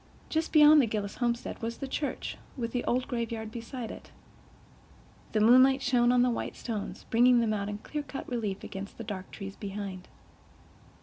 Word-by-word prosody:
Just 320 +1 -1
beyond 300 -1 +8
the 245 - +1
Gillis 205 -2 -3
homestead 240 -1 -2
was 230 0 -3
the 275 - -5
church, 285 +2 -3 0.2
with 230 -2 -3
the 245 - -1
old 250 +1 0
graveyard 230 -3 -3
beside 235 +1 -6
it. - - -11 1.2
The 215 - +2
moonlight 255 +5 +6
shone 245 -1 +3
on 245 0 +4
the 250 - +3
white 230 - -3
stones, 220 -4 -5
bringing 245 +1 +6
them 225 -2 +1
out 200 -1 -2
in 205 - -4
clear 295 +7 -5
cut 285 -1 -7
relief 215 -6 -3
against 195 0 -7
the 230 - -6
dark 195 -4 -6
trees 195 -1 -8
behind. 195 -2 -6
235 Hz, 180 wpm, -29 LUFS, 210-250 Hz, 1.2 s, beyond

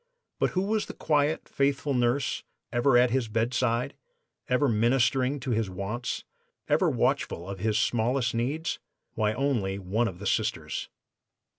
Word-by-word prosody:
But - - +3
who 185 - +3
was 215 +1 0
the - - -8
quiet, 150 0 +1
faithful 140 +1 0
nurse, 125 +2 +1 0.3
ever 120 +1 +4
at 125 0 +4
his 130 -2 +1
bedside, 120 +3 0 0.6
ever 125 +3 +3
ministering 130 +4 +2
to 130 0 -3
his 110 -3 0
wants, 100 +6 -4 0.4
ever - - +3
watchful 85 +2 0
of 100 -1 -6
his 110 +2 +1
smallest 120 +2 +1
needs? 140 +8 -1 0.3
Why 105 -1 +1
only 115 -7 0
'one 100 +5 0
of 95 -5 -6
the 100 - -8
Sisters. - - -1
120 Hz, 145 wpm, -28 LUFS, 110-135 Hz, 0.6 s, ever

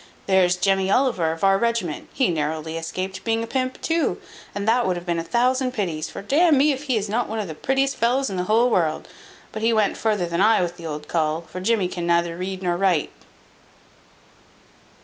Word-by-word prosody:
There's 185 -2 +3
Jemmy 195 +1 +1
Oliver, 200 -9 +2
of 165 +2 -7
our 195 0 +4
regiment, 230 -9 -2
he 260 -6 +1
narrowly 160 0 -2
escaped 185 +3 -5
being 225 0 0
a - - -3
pimp 255 +2 -2
too, 330 0 0 0.4
and 200 +1 -3
that 240 +2 +3
would 185 - +1
have 175 0 -7
been 170 -2 -1
a - - -3
thousand 255 +6 +1
pities; 165 -7 -2
for - - -8
d 275 +8 0
n 330 -4 +5
me 290 +3 +4
if 275 +1 -4
he 255 -5 +1
is 210 0 -2
not 230 +4 -1
one 220 - -3
of 210 -3 -3
the 160 - -6
prettiest 270 - 0
fellows 255 +4 +1
in 195 - -4
the 180 0 -2
whole 235 +3 +4
world; 160 -6 0 0.4
but 215 - -6
he 225 +1 +2
went 215 -2 +1
farther 210 -4 0
than 170 +1 -1
I 220 +2 +5
with 175 0 -4
the 170 -2 -7
old 150 -1 -6
cull, 160 -1 0
for 170 +2 -9
Jimmey 205 -2 +1
can 175 -1 -4
neither 170 0 +1
write 185 +1 -5
nor 175 -1 0
read." 180 -5 +1
195 Hz, 220 wpm, -23 LUFS, 170-235 Hz, 0.4 s, n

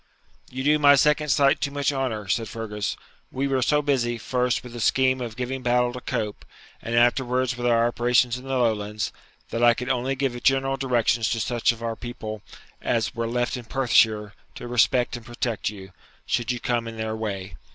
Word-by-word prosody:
'You 130 +1 -5
do 150 +2 +3
my 140 -1 +7
second 150 +2 +2
sight 140 +1 +3
too 140 - 0
much 145 0 -1
honour,' 120 -7 -2
said 115 +2 -1
Fergus. 105 -2 -4 0.3
'We 135 +1 -1
were 135 -1 +1
so 150 +4 +2
busy, 120 -5 0
first 125 +1 -1
with 125 -1 -10
the 120 - -6
scheme 130 +2 +2
of 115 -3 -5
giving 125 +1 -3
battle 125 0 +2
to 125 - -7
Cope, 110 -6 -3 0.4
and 115 - -3
afterwards 125 +1 +2
with 120 0 -2
our 115 -1 +4
operations 120 0 +2
in 125 +1 -9
the - - -9
Lowlands, 105 -3 0 0.4
that 115 - -1
I 120 -1 +6
could 125 +2 -5
only 130 +1 0
give 130 -3 -2
general 135 +1 +2
directions 120 -4 +1
to 115 - -1
such 120 +1 +1
of 115 0 -9
our 115 -1 -2
people 110 -3 -7 0.4
as 115 -4 0
were 115 -1 -2
left 120 +2 -1
in 125 -2 -7
Perthshire 110 -5 +2 0.2
to 120 - -7
respect 120 +2 +2
and 120 - -12
protect 120 -3 -2
you, 95 -3 -10 0.3
should 120 +1 0
you 125 - -3
come 120 -1 -1
in 115 0 -7
their 110 0 -3
way. 100 -4 -4
120 Hz, 200 wpm, -24 LUFS, 115-130 Hz, 0.4 s, my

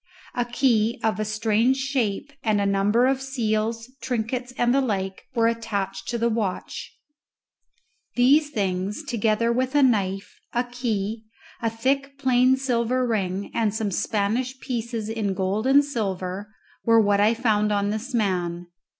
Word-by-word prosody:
A 245 - 0
key 240 -1 +1
of 220 -1 +1
a - - +1
strange 220 +4 +2
shape 270 0 -1
and 215 -2 +1
a 200 - +1
number 200 +5 +3
of 265 0 +1
seals, 225 -3 -1
trinkets, 245 +1 -2
and 240 0 +3
the 275 - +3
like, 195 -6 -2
were 230 -1 +4
attached 200 -4 -2
to 240 - -1
the 235 0 +1
watch. 220 -5 -3 1.2
These 285 +5 +4
things, 195 -4 -2
together 230 0 +1
with 255 +3 -1
a 290 - +5
knife, 195 -6 0
a 240 - +2
key, 225 -3 -3 0.4
a 230 - +1
thick 275 +5 -1
plain 260 -1 +4
silver 255 -1 0
ring, 195 -3 -2
and 220 -2 0
some 220 -2 -1
Spanish 230 +7 -1
pieces 235 -4 -3
in 215 -3 -2
gold 195 +5 -1
and 280 +2 +6
silver 200 -5 -3 0.3
were 230 0 +5
what 205 -2 +3
I 215 +3 +4
found 215 -3 +1
on 205 0 +1
this 220 +5 -4
man. 180 -6 -1
225 Hz, 150 wpm, -24 LUFS, 205-250 Hz, 1.2 s, and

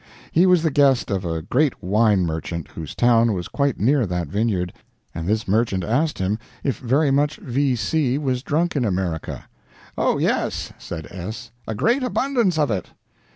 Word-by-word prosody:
He 175 +3 +4
was 180 -3 +4
the 160 - +2
guest 135 -5 +3
of 95 -2 -1
a 80 -1 -2
great 135 - 0
wine 105 0 +3
merchant 80 0 -4
whose 80 -2 -8
town 115 -2 +4
was 90 -2 -3
quite 140 -3 0
near 130 +1 +3
that 90 -3 -2
vineyard, 100 -3 0 0.4
and 85 0 -5
this 110 +2 0
merchant 100 -2 +1
asked 145 - 0
him 95 +4 -1 0.2
if 135 -6 -1
very 135 +4 +2
much 145 +2 +2
V. 135 +1 0
C. 130 +4 0
was 130 -4 -1
drunk 160 +5 0
in 135 - +1
America. 90 -6 -2 0.5
"Oh, - - +1
yes," - - -1
said 80 -3 -6
S., 95 +4 -7 0.2
"a 110 - -3
great 235 - +2
abundance 250 - +1
of 150 -5 +2
it." 95 -4 -2
115 Hz, 175 wpm, -22 LUFS, 95-145 Hz, 0.5 s, He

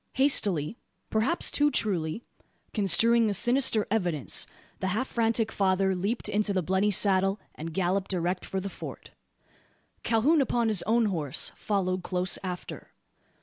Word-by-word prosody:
Hastily 210 - +2 0.3
perhaps 240 +11 +1
too 290 0 +2
truly 205 - -2 0.5
construing 225 +3 +4
the 205 - 0
sinister 240 0 +3
evidence, 175 - 0 0.3
the 190 - -2
half 220 +8 -1
frantic 225 -1 0
father 190 0 +1
leaped 200 +6 -2
into 210 0 0
the 185 -2 0
bloody 190 +4 +1
saddle, 195 0 +2
and 165 +2 -7
galloped 190 +3 -1
direct 180 0 -2
for 190 - -4
the 195 - -5
Fort. 195 - -9 0.9
Calhoun, 275 +8 +2
upon 240 -4 0
his 205 -5 +3
own 230 +1 +3
horse, 160 -9 -2
followed 185 -3 -2
close 180 0 0
after. 180 -2 -7
200 Hz, 140 wpm, -27 LUFS, 185-225 Hz, 0.9 s, construing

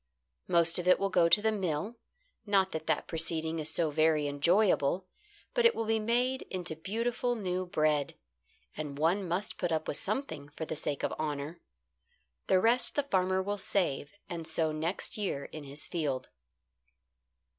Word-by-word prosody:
Most 170 0 +4
of 180 - -4
it 180 - +6
will 195 0 -1
go 175 -2 +4
to 205 +5 +5
the 220 - +3
mill: 195 +1 -2 0.5
not 195 -3 +2
that 160 0 -5
that - - +1
proceeding 160 0 0
is 155 0 +1
so 160 -2 +1
very 155 0 +3
enjoyable, 170 +3 +2 0.5
but 485 - +2
it 470 0 +5
will 225 - -2
be 220 0 +1
made 245 +4 +1
into 180 -4 -4
beautiful 230 +8 -1
new 185 -4 -2
bread, 155 -4 +1 0.6
and 150 -2 -5
one 175 +6 +1
must 185 +5 -3
put 175 - -1
up 160 -1 -1
with - - +1
something 195 - -2
for 160 +2 -6
the 160 - -4
sake 150 -2 -2
of - - 0
honour. 150 +1 -4 0.9
The 190 - +4
rest 235 +5 +4
the 290 - +2
farmer 190 -6 +1
will 205 +1 -2
save, 175 -8 -1
and 170 -4 -5
sow 160 -1 0
next 165 +7 -2
year 145 -9 -2
in 155 -2 -8
his 140 +2 -5
field." 140 -7 -2
175 Hz, 170 wpm, -31 LUFS, 155-205 Hz, 0.9 s, it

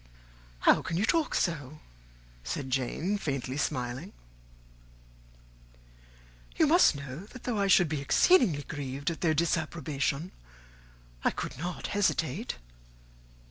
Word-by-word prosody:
"How - - +5
can 165 - -3
you 200 - +2
talk 315 +3 +1
so?" 150 -4 -1 0.6
said 130 - -4
Jane, 150 +10 -1
faintly 135 -5 -3
smiling; 125 -3 -3 2.4
"you - - +4
must 320 - +5
know, 140 +6 -7
that, 255 +2 -12
though 235 -4 -1
I 200 - +2
should 185 -2 +5
be 150 -2 -2
exceedingly 170 - +4
grieved 140 0 -4
at 165 - -7
their 160 -3 +2
disapprobation, 155 -1 -1 0.9
I - - +4
could - - -5
not 175 +3 -4
hesitate." 195 - 0
160 Hz, 115 wpm, -29 LUFS, 140-195 Hz, 2.4 s, How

